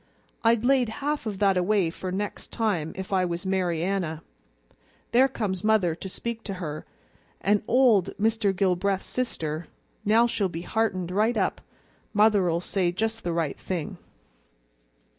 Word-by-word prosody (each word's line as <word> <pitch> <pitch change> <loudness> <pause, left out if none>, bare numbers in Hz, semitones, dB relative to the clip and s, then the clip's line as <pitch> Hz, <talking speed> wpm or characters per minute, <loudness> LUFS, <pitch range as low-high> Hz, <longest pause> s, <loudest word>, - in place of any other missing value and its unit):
I'd 230 0 +3
laid 260 -3 +3 0.2
half 295 -5 -1
of 205 -3 -3
that 195 -1 +3
away 180 -2 +2
for 185 +1 -5
next 200 +2 -4
time, 195 -9 -1
if 190 +1 -5
I 185 -1 +3
was 175 0 -3
Mary 180 -4 0
Anna. 175 -4 -2 0.9
There 255 +3 +5
comes 205 -8 -3
mother 210 -6 +3
to 190 +4 -7
speak 230 +3 -4
to 195 - -4
her, 155 -4 -6 0.5
an' 205 +1 +2
old 235 -7 +4
Mr. 220 -1 +2
Gilbreath's 190 0 0
sister; 165 -10 -3 0.4
now 225 +3 +5
she'll 205 -5 0
be 170 0 -6
heartened 185 -6 -1
right 215 +5 +2
up. - - 0 0.5
Mother'll 200 -5 +4
say 180 -1 0
just 225 +4 -2
the 175 - -1
right 165 -4 -1
thing." 175 -5 -4
195 Hz, 150 wpm, -26 LUFS, 175-220 Hz, 0.9 s, There